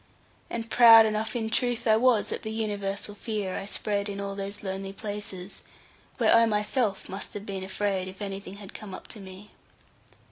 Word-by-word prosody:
And 230 -1 -4
proud 225 -2 +9
enough 215 +1 -1
in 220 -2 -2
truth 240 -1 +1
I 220 -2 +5
was 230 -2 +3
at - - -3
the 220 - -5
universal 205 -2 -2
fear 205 -3 -3
I 195 - -4
spread 205 0 -1
in 200 0 -5
all 200 0 -3
those 200 +1 -5
lonely 195 0 -4
places, 205 -2 -6 0.6
where - - +4
I 230 0 +6
myself 210 0 0
must 195 +2 -5
have 205 0 -6
been 195 -2 -4
afraid, 190 -1 -1
if 190 0 -9
anything 195 -1 -5
had 200 -1 -10
come 200 -3 -7
up - - -11
to 215 - -9
me. 190 +1 -11
205 Hz, 185 wpm, -27 LUFS, 195-220 Hz, 0.6 s, proud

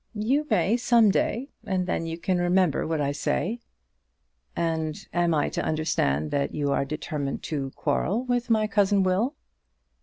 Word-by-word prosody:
"You 265 +8 0
may 225 +5 +2
some 235 -3 +4
day; 245 +7 -1
and 185 -2 -1
then 165 -2 -2
you 165 0 -4
can 180 +1 0
remember 175 -3 +2
what 160 -1 -1
I 140 -1 0
say." 205 +9 -1 1.0
"And 160 -2 -1 0.2
am 175 -1 +2
I 150 - +1
to - - -2
understand 75 - 0
that 140 0 -1
you 145 -2 0
are 140 - +1
determined 150 -1 -4
to 140 -4 -3
quarrel 185 - 0
with 245 -1 -1
my 220 -2 +3
cousin 200 -1 +2
Will?" 200 +10 +1
175 Hz, 160 wpm, -26 LUFS, 155-215 Hz, 1.0 s, some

